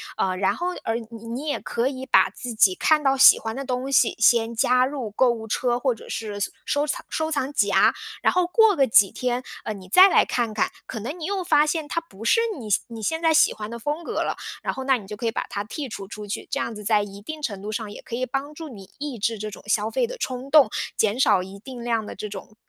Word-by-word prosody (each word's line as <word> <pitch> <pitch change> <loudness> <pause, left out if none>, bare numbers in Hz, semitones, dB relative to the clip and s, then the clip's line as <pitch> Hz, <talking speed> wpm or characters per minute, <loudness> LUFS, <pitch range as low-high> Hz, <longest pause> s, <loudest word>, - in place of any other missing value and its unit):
呃， 185 -1 -1
然 190 0 +1
后， 350 - -3 0.2
呃， 225 - 0 0.2
你 230 0 -10
你 250 +6 -5
也 290 - -1
可 235 +3 -1
以 260 -1 -6
把 - - +4
自 245 -2 -7
己 200 -4 +4
看 305 +7 +2
到 270 -1 +3
喜 265 - +9
欢 225 0 -5
的 275 - -5
东 255 +1 -3
西 245 -3 +3
先 230 0 +4
加 250 +2 +3
入 260 -6 -4
购 250 +4 +3
物 225 -2 -5
车， 240 +2 0
或 255 -1 +1
者 - - -13
是 210 -2 -5
搜 200 - 0 0.2
收 290 +1 0
藏 - - -3
收 315 0 -2
藏 285 -3 -1
夹， 205 -8 +3 0.3
然 - - +3
后 360 -1 +2
过 445 +3 +5
个 270 -2 +4
几 205 -3 +5
天， 250 0 -2 0.2
呃， 215 - -2
你 190 -3 -12
再 370 - +8
来 - - +4
看 235 -3 -1
看， 215 - 0
可 225 - -6
能 285 - -6
你 315 - -4
又 385 0 -2
发 300 -3 +4
现 315 0 -1
它 335 - 0
不 225 -11 -14
是 345 - +4 0.2
你 225 -4 -8
现 200 - +3
你 230 -2 -8
现 320 +9 -1
在 325 -1 +3
喜 315 - +5
欢 210 0 -7
的 235 - -6
风 295 +7 -3
格 - - -4
了， - - -3 0.3
然 - - -1
后 265 - -6
那 265 0 +4
你 210 - -11
就 210 +1 -7
可 235 - -5
以 225 - +1
把 - - -2
它 205 -3 -4
剔 275 +5 -6
除 195 -3 -7
出 210 +1 -8
去。 205 - -5
这 - - -2
样 - - -2
子 210 -1 -9
在 210 -1 +3
一 200 0 -9
定 310 +8 -7
程 200 -9 -4
度 210 - -6
上 215 -1 -4
也 - - -10
可 235 - -6
以 255 +2 -1
帮 275 +3 -4
助 315 0 -8
你 195 -6 -12
抑 285 -5 -5
制 230 -2 0
这 215 +1 -4
种 - - -11
消 210 +1 +1
费 480 - 0
的 - - -7
冲 255 - -4
动， 290 -7 +7 0.3
减 220 +2 +1
少 205 -8 +4
一 190 +1 -10
定 245 +2 -9
量 230 -2 -1
的 - - -8
这 210 - -6
种， 205 +1 -9
240 Hz, 295 characters per minute, -24 LUFS, 215-285 Hz, 0.3 s, 喜